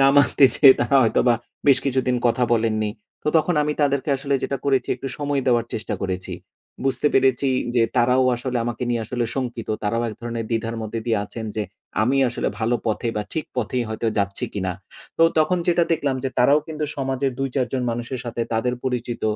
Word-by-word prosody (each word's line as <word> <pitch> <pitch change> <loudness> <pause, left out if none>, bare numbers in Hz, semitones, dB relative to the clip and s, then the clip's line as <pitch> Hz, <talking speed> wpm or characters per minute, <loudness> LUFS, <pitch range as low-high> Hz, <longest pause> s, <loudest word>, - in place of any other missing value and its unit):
না 135 - +6
মানতে 140 0 +5
চেয়ে 135 -3 +8
তারা 120 +3 +3
হয়তোবা 120 +1 +3 0.3
বেশ 140 - +7
কিছুদিন 130 -2 +1
কথা 120 +1 +2
বলেননি। 110 -2 +1 0.3
তো - - -1
তখন 160 +2 +2
আমি 150 0 0
তাদেরকে 140 0 +1
আসলে 140 +1 -2
যেটা 140 - -1
করেছি, 135 -2 +1
একটু 135 - -5
সময় 145 -1 0
দেওয়ার 120 -2 +2
চেষ্টা 110 - -3
করেছি। 95 -1 -3 0.5
বুঝতে 135 +2 +1
পেরেছি 135 0 +3 0.3
যে 120 - +4
তারাও 125 +2 +4
আসলে 125 0 -2
আমাকে 120 +1 -4
নিয়ে 115 -1 0
আসলে 120 +1 -2
শঙ্কিত। 120 -4 -4
তারাও 115 +3 0
এক 105 - -6
ধরণের 115 -1 -4
দ্বিধার 115 0 -1
মধ্যে 110 +1 -4
দিয়ে 110 -3 +2
আছেন, 115 +2 -7
যে 105 - 0 0.4
আমি 130 +5 +2
আসলে 120 - -2
ভালো 115 +2 +1
পথে 110 +2 -1
বা 105 - 0
ঠিক 160 - -2
পথেই 125 +1 -1
হয়তো 110 +1 -3
যাচ্ছি 100 +4 -1
কিনা? 95 -2 -1 0.5
তো - - +5 0.2
তখন 155 +3 +3
যেটা 175 -1 +3
দেখলাম, 140 -4 0
যে - - +1
তারাও 140 +5 +5
কিন্তু 155 -1 -3
সমাজের 135 -1 -1
২, 135 0 0
৪ 130 -3 +1
জন 130 -1 0
মানুষের 120 +2 -4
সাথে, 120 0 -4
তাদের 125 +2 0
পরিচিত 125 -2 -3
125 Hz, 195 wpm, -22 LUFS, 115-135 Hz, 0.5 s, চেয়ে